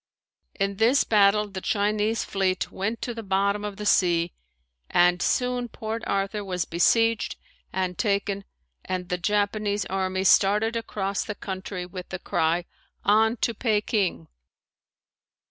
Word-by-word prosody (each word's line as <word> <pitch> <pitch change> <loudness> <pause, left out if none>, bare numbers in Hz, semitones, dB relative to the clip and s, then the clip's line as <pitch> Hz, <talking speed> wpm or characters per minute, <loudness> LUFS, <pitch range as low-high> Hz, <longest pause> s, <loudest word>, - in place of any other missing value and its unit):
In 195 -1 -1
this 240 +6 +4
battle 210 0 +4
the 190 -2 -7
Chinese 210 +2 0
fleet 190 -1 -1
went 215 +5 -3
to 240 - -3
the 225 - -6
bottom 200 0 0
of 205 -1 -5
the 210 - -5
sea 175 -4 +3 0.6
and 175 0 +4
soon 250 -1 0
Port 225 0 -5
Arthur 200 +1 -1
was 180 -3 -2
besieged 225 +6 +2 0.4
and 185 -1 -2
taken 200 -2 0 0.4
and 180 -1 -4
the 180 - -1
Japanese 205 +1 0
army 190 0 -1
started 210 +4 +4
across 200 -4 -2
the 210 - -5
country 190 -2 -5
with 180 0 -8
the 185 - -4
cry, 170 0 0 0.4
"On 220 +3 +4
to 235 - -2
Peking." 210 - 0
200 Hz, 135 wpm, -25 LUFS, 185-215 Hz, 0.6 s, this